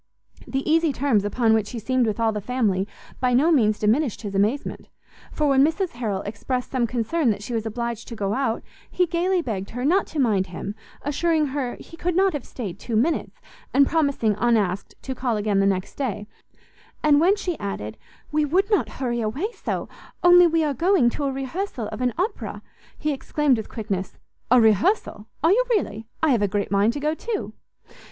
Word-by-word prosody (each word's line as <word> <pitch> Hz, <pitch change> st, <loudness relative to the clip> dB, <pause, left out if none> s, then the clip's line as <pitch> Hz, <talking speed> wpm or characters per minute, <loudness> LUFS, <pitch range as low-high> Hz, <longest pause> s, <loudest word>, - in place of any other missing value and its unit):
The 270 Hz, 0 st, -2 dB
easy 325 Hz, 0 st, +3 dB
terms 255 Hz, -6 st, +1 dB
upon 225 Hz, +2 st, +2 dB
which 220 Hz, -2 st, +1 dB
he 245 Hz, -, -6 dB
seemed 250 Hz, +2 st, +1 dB
with 215 Hz, +1 st, -2 dB
all 225 Hz, -1 st, +2 dB
the 210 Hz, -1 st, -4 dB
family 205 Hz, -5 st, 0 dB, 0.3 s
by 250 Hz, -1 st, +2 dB
no 300 Hz, +7 st, +4 dB
means 215 Hz, -8 st, +3 dB
diminished 230 Hz, +3 st, +1 dB
his 205 Hz, -2 st, -5 dB
amazement; 210 Hz, +8 st, -1 dB, 0.4 s
for 300 Hz, -, -1 dB
when 270 Hz, -1 st, +5 dB
Mrs 330 Hz, +4 st, +1 dB
Harrel 215 Hz, -5 st, -3 dB
expressed 245 Hz, +5 st, -3 dB
some 250 Hz, -3 st, +1 dB
concern 245 Hz, +5 st, 0 dB
that 205 Hz, -1 st, -1 dB
she 240 Hz, -, -5 dB
was 225 Hz, -1 st, -1 dB
obliged 235 Hz, 0 st, -4 dB
to 235 Hz, -, -7 dB
go 200 Hz, -2 st, -1 dB
out, 245 Hz, -3 st, -1 dB, 0.3 s
he 365 Hz, -, +2 dB
gaily 350 Hz, +1 st, 0 dB
begged 200 Hz, -7 st, -4 dB
her 245 Hz, +2 st, -4 dB
not 370 Hz, +6 st, +3 dB
to -, -, -8 dB
mind 205 Hz, -7 st, +2 dB
him, 180 Hz, +3 st, -6 dB, 0.3 s
assuring 310 Hz, +2 st, +1 dB
her 260 Hz, -4 st, -2 dB
he 330 Hz, -, -13 dB
could 355 Hz, 0 st, -1 dB
not 385 Hz, +1 st, +3 dB
have 290 Hz, -4 st, -4 dB
stayed 200 Hz, -6 st, -6 dB
two 230 Hz, -, -4 dB
minutes, 290 Hz, +10 st, 0 dB, 0.4 s
and 280 Hz, +1 st, +7 dB
promising, 280 Hz, -9 st, +1 dB
unasked, 210 Hz, -6 st, +1 dB
to 265 Hz, -, -3 dB
call 245 Hz, -3 st, -1 dB
again 205 Hz, -1 st, +1 dB
the 195 Hz, -, +3 dB
next 190 Hz, -1 st, -1 dB
day: 210 Hz, -7 st, -2 dB, 0.8 s
and 300 Hz, -1 st, +5 dB
when 375 Hz, +5 st, +5 dB
she 370 Hz, -4 st, -3 dB
added, 110 Hz, -, -4 dB, 0.4 s
"We 305 Hz, 0 st, +2 dB
would 370 Hz, +9 st, +1 dB
not 410 Hz, -, +2 dB
hurry 240 Hz, -3 st, -1 dB
away 275 Hz, -, -2 dB
so, -, -, -4 dB, 0.4 s
only 355 Hz, 0 st, +8 dB
we 330 Hz, -1 st, +2 dB
are 295 Hz, -2 st, 0 dB
going 330 Hz, -4 st, +3 dB
to 285 Hz, -, -3 dB
a 275 Hz, -, 0 dB
rehearsal 270 Hz, -, -4 dB
of -, -, -6 dB
an 250 Hz, -2 st, 0 dB
Opera," 400 Hz, +5 st, -3 dB, 0.3 s
he 305 Hz, -1 st, -1 dB
exclaimed 280 Hz, -1 st, +1 dB
with 220 Hz, -, -6 dB
quickness, 200 Hz, -4 st, -4 dB, 0.3 s
"A 250 Hz, +1 st, +6 dB
rehearsal! 220 Hz, -, +2 dB, 0.2 s
are 325 Hz, -, +5 dB
you 480 Hz, +6 st, +4 dB
really? 225 Hz, -, -1 dB, 0.2 s
I 315 Hz, -, +4 dB
have 235 Hz, -5 st, +2 dB
a 205 Hz, -, +3 dB
great 200 Hz, 0 st, -2 dB
mind 205 Hz, +3 st, +3 dB
to 290 Hz, -, -4 dB
go 300 Hz, +2 st, 0 dB
too!" 435 Hz, +6 st, -4 dB
250 Hz, 200 wpm, -24 LUFS, 215-310 Hz, 0.8 s, only